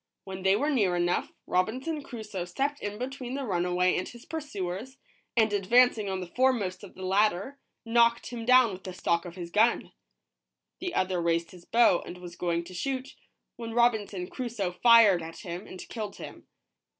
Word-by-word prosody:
When 190 0 -7
they 190 +1 +4
were 290 +8 +1
near 200 -10 +2
enough, 175 0 0
Robinson 255 - -1
Crusoe 215 -9 -6
stepped 275 +11 -2
in 205 0 -5
between 255 +1 -5
the 280 - -3
runaway 180 -2 +1
and 185 - -2
his 240 0 -13
pursuers, 260 - -5 0.4
and 220 -2 +4
ad 195 -2 -1
vancing 235 -3 +4
on 190 -1 -3
the - - -4
foremost 230 -8 +1
of 200 - -12
the 185 - -7
latter, 205 +7 +1 0.3
knocked 235 +1 +3
him 235 -2 -5
down 250 -2 +5
with 185 - -9
the 185 -1 -7
stock 170 -1 0
of 175 -1 -8
his 175 -2 -7
gun. 225 +5 +2 0.9
The 360 -1 -4
other 185 -1 0
raised 170 0 0
his 175 -1 -14
bow 230 -6 +4
and 180 - -9
was 175 -1 -10
going 170 -1 -1
to 175 - -11
shoot, 260 +7 -3 0.4
when 230 -1 -6
Robinson 215 -6 +2
Crusoe 225 -4 -3
fired 220 -3 +6
at 165 0 -8
him 175 +2 -7
and 185 - -9
killed 215 -3 -5
him. - - -10
205 Hz, 185 wpm, -28 LUFS, 180-240 Hz, 0.9 s, fired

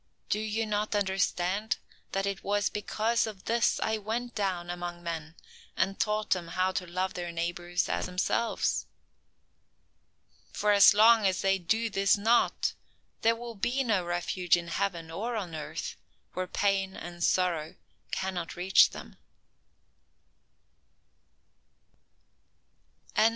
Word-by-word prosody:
"Do 210 - +1
you 220 +1 -1
not 210 0 -1
understand 195 +1 0 0.3
that 195 0 -1
it 200 -1 -3
was 205 0 +1
because 220 +2 0
of 200 -3 -9
this 230 0 +2
I 220 0 0
went 230 +3 -3
down 185 -4 -2
among 175 0 -6
men 165 -1 -5 0.4
and 195 0 0
taught 215 0 0
them 175 -3 +1
to 185 0 0
love 185 +2 -2
their 175 -1 -4
neighbors 175 +1 -2
as - - -1
themselves? 185 +5 0 1.6
For 210 - +1
as 205 +1 +8
long 220 0 +6
as 185 -1 0
they 195 0 +3
do 220 +6 0
this 195 +1 +3
not, 225 +4 +2 0.5
there 230 +1 +4
will 235 0 -7
be 245 +6 0
no 210 -7 +1
refuge 175 0 +1
in 170 -1 -6
heaven 170 -2 -2
or 230 +8 -3
on 185 -6 -4
earth 155 -1 -5 0.4
where 185 0 -3
pain 195 0 0
and 175 0 -7
sorrow 170 -5 +1 0.3
cannot 185 -3 -3
reach 185 +2 +5
them." - - -11
195 Hz, 125 wpm, -29 LUFS, 175-215 Hz, 1.6 s, as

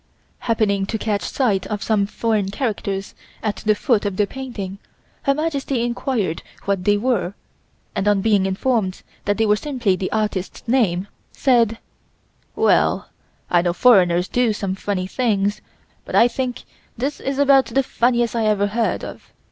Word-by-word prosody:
Happening 205 -4 +1
to 220 - -2
catch 210 -2 -1
sight 205 -8 0
of 210 -2 -3
some 205 -3 +1
foreign 215 -2 0
characters 200 -4 -3 0.3
at 210 -1 -1
the 215 -1 +1
foot 225 -1 +1
of 200 -3 -2
the 210 - +3
painting 200 -6 -6 0.4
Her 275 -1 +2
Majesty 280 -5 -1
inquired 235 -7 -1 0.2
what 195 -2 -1
they 205 0 +4
were 205 -5 0 0.6
and 205 -1 -1
on 205 -1 +3
being 205 -2 +3
informed 195 -1 -1 0.2
that 205 0 +1
they 225 - +2
were 210 -1 +4
simply 240 -6 0
the 185 0 -3
artist's 210 -3 -2
name, 205 -7 +2 0.2
said: 235 -4 +2 0.8
"Well, - - +2 0.4
I 175 - +5
know 175 0 0
foreigners 180 -5 +4
do 245 -1 +1
some 200 -2 -2
funny 195 -1 -2
things, 205 -2 0 0.4
but - - -5
I 235 - +7
think 250 0 -3 0.3
this 275 +5 -3 0.2
about 275 -1 +5
the 270 - +1
funniest 240 -2 +1
I 225 -2 +1
ever 205 -1 +2
heard 220 +2 -1
of. - - -9
215 Hz, 155 wpm, -21 LUFS, 195-240 Hz, 0.8 s, I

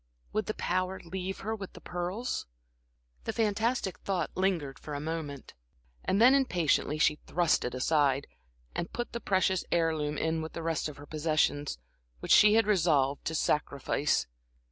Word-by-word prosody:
Would 215 - -1
the 215 - -2
power 185 +1 -1
leave 185 +2 -5
her 220 +2 -2
with 195 -3 -8
the - - -11
pearls? 180 - -3 0.8
The - - -2
fantastic 220 -1 0
thought 185 -5 -2
lingered 170 -8 -1
for 150 - -6
a - - -3
moment, 150 -3 -5 0.5
and 195 - +1
then 245 +4 +7
impatiently 175 - +2
she 150 -1 +3
thrust 170 -1 +2
it 125 - -3
aside, 140 0 +2 0.5
and 170 - -3
put 240 0 -4
the 235 - -4
precious 190 -1 +2
heirloom 160 -3 +1
in 160 0 0
with 160 - -6
the 165 - -5
rest 165 -1 -1
of 150 - -10
her 145 - -10
possessions, 150 - 0 0.4
which - - -4
she 210 0 +8
had 225 - +4
resolved 155 -9 +2
to 160 - -1
sacrifice. 145 -1 +1
165 Hz, 165 wpm, -30 LUFS, 150-195 Hz, 0.8 s, she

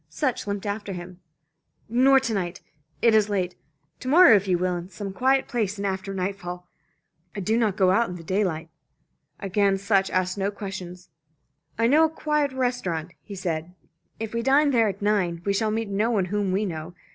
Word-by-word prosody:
Sutch 260 -8 -2
limped 200 0 -3
after 205 -1 -3
him. 180 0 -9 0.7
"Nor 260 +4 +5
to 235 -3 -2
night. 180 -3 -3 0.4
It 230 - +5
is 215 -1 +4
late. 185 -3 -1 0.5
To - - -8
morrow 335 -2 +8
if 200 -1 +1
you 180 -2 +2
will, 180 0 0
in 175 +1 -6
some 195 +1 -6
quiet 265 +6 +2
place, 210 -4 -2
and 200 - -3
after 190 0 -3
nightfall. 180 -2 -4 0.7
I - - -3
do 215 +4 0
not 220 -4 +1
go 185 -2 +4
out 230 +5 +2
in 180 - -6
the 170 - -9
daylight." 170 -3 -1 0.7
Again 200 0 +1
Lieutenant 195 - -3
Sutch 195 -1 +2
asked 185 +1 -1
no 195 +1 +1
questions. 190 -3 -8 0.7
"I 230 - +2
know 300 +7 +5
a - - 0
quiet 300 -2 0
restaurant," 245 -11 -2
he 200 - -9
said. 175 -1 -4 0.4
"If 225 0 -5
we 230 - -1
dine 280 +4 +4
there 230 -4 +3
at 200 0 -4
nine, 180 -5 0
we 200 - +1
shall 215 +2 +1
meet 220 +1 -1
no 205 +3 0
one 205 -6 +1
whom 200 +1 -1
we 200 +3 0
know. 165 -1 -6
200 Hz, 200 wpm, -25 LUFS, 185-225 Hz, 0.7 s, morrow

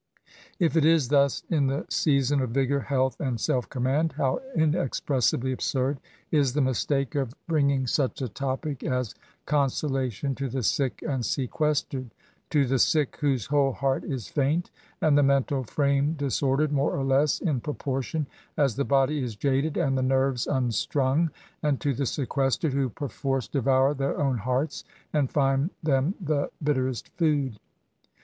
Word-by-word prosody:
If 170 -4 +1
it 160 - +4
is 155 -5 +4
thus 140 -2 +3
in 145 -5 +2
the 135 +3 -1
jseason 140 -2 +1
of 130 - -1
vigour, 135 +3 +1
health, 130 +1 0
and 125 -5 -2
self 125 +3 0
command, 140 +5 0
how 135 - 0 0.2
jijpxpressibly 135 -5 +1
absurd 130 +2 -1 0.3
is 140 -5 +2
the 150 - 0
mistake 135 +1 0
of 135 -3 -2
bringing 140 -5 +2
SYMPATHY 130 +2 +1
TO 135 - -3
THIS - - -11
INVALID. 135 -1 0
21 150 -4 -4
9acE - - -38
a - - -22
topic - - 0
as 125 -4 -2 0.3
consolation 135 -3 0
to 135 0 -3
the 130 +1 -3
sick 130 +4 0
and 135 -4 -1
seques 140 +4 0
tered! 130 -3 -6 0.2
— - - -40
to 145 -3 +3
the 135 +1 +1
sick^ 150 +2 +2
whose 135 -7 0
whole 140 -2 +2
heart 135 0 0
is 130 -7 -4
faint, 150 +5 0 0.3
and 155 -2 +4
the 145 - +5
mental 140 -1 +2
frame 140 +4 +1
disordered, 140 0 0
more 140 0 +1
or 135 - -1
less, 135 +2 +2
in 145 -9 -1
proportion 145 +1 -2 0.3
as 135 -6 +2
the 140 - +1
body 140 +2 +2
is 120 -4 -4
jaded 140 +6 0
and 135 -6 +1
the 130 - +1
nerves 130 -1 +1
mxstrung; 130 +4 +1 0.3
and 145 -3 +1
to 140 - 0
the 135 +1 -1
sequestered, 135 +2 0
who 135 -2 +1
perforce 135 -1 -3
devour 135 0 +2
their 135 -1 -2
own 135 -4 +1
hearts, 130 +7 -1 0.3
and 145 -4 +2
find 135 +2 +2
them 145 +4 +1
the 150 -2 0
bitter 135 -3 +1
est 120 -5 -6
food 145 - +1
135 Hz, 175 wpm, -26 LUFS, 130-145 Hz, 0.3 s, the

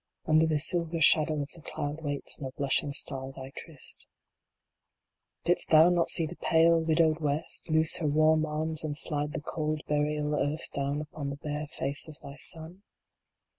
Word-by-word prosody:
Under 155 +1 +4
the 155 -1 +1
silver 170 +1 0
shadow 155 -1 +3
of 140 - -10
the 165 - -12
cloud 150 0 -5
waits 145 -2 -1
no 135 - -4
blushing 140 0 +1
star 135 -1 +1
thy 135 0 -9
tryst 155 -5 -7 1.4
Didst 175 0 +1
thou 160 +2 +7
not 175 -1 +2
see 165 - +5
the 170 +3 -8
pale, 165 0 +3
widowed 160 0 +2
West 150 +2 -1
loose 160 0 +4
her 160 - -1
warm 155 +1 +3
arms 155 +1 -3
and 150 -2 -3
slide 150 -2 0
the - - -4
cold 155 0 -3
burial 150 0 0
earth 145 +1 -2
down 140 +1 -1
upon 150 -2 -6
Ihe 140 - -8
bare 150 0 -3
face 140 +1 -3
of 155 -2 -12
thy 140 - -10
sun 160 +5 -3
155 Hz, 170 wpm, -29 LUFS, 145-160 Hz, 1.4 s, thou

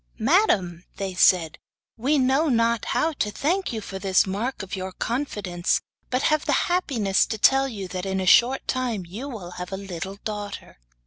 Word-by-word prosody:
'Madam,' 215 - +2
they 195 -2 -3
said, 180 -3 +3 0.4
'we 270 +6 +1
know 270 +4 +2
not 230 -2 +2
how 325 - +1
to 215 -7 -1
thank 345 - -1
you 225 - -3
for 195 -1 -7
this 190 -1 +3
mark 205 +5 -3
of 190 - -5
your 190 0 -5
confidence, 205 -7 -1 0.3
but 255 +2 0
have 305 -1 +2
the - - +3 0.2
happiness 230 - +2
to 220 - -3
tell 270 +5 +4
you 205 -7 -6
that 185 +1 -5
in 190 0 -1
a 190 - -2
short 245 +8 +4
time 240 -7 -1
you 220 +11 -7
will 195 -9 -7
have 180 - -6
a 190 - -3
little 190 -1 -6
daughter. 205 - -6
210 Hz, 185 wpm, -24 LUFS, 190-260 Hz, 0.4 s, tell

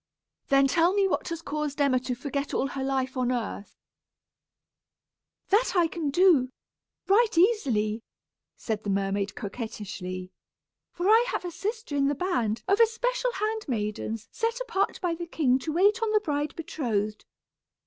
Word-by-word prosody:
"Then 275 -1 +5
tell 335 +6 +3
me 400 -1 +3
what - - -1
has 335 -1 -5
caused 300 -1 -3
Emma 275 -3 +3
to 250 0 -3
forget 280 +2 -3
all 270 - 0
her 270 -1 -4
life 265 -1 -1
on 255 -1 0
earth?" 225 -4 -4 1.7
"That 415 +5 +3
I 345 -2 +4
can 320 -2 -3
do, 300 -5 +4 0.6
right 425 -1 +3
easily," 245 - +2 0.6
said 220 -2 -3
the 205 - -3
mermaid, 195 0 -1
coquettishly; 195 -4 -6 0.6
"for 350 +2 -2
I 445 +3 +6
have 365 - -3
a 350 - -3
sister 425 -3 -4
in 275 -1 +2
the 285 - +1
band 235 - -1
of 400 +2 +3
especial - - +2
hand 430 +1 -2
maidens 215 -2 -3
set 460 +1 -1
apart 455 -6 -1
by 355 -3 0
the 340 +1 -6
king 265 -6 +2
to 310 +4 -4
wait 405 +7 +3
on 445 -1 +1
the 425 - +5
bride 295 -6 -2
betrothed. 220 -10 -2
290 Hz, 160 wpm, -27 LUFS, 235-390 Hz, 1.7 s, I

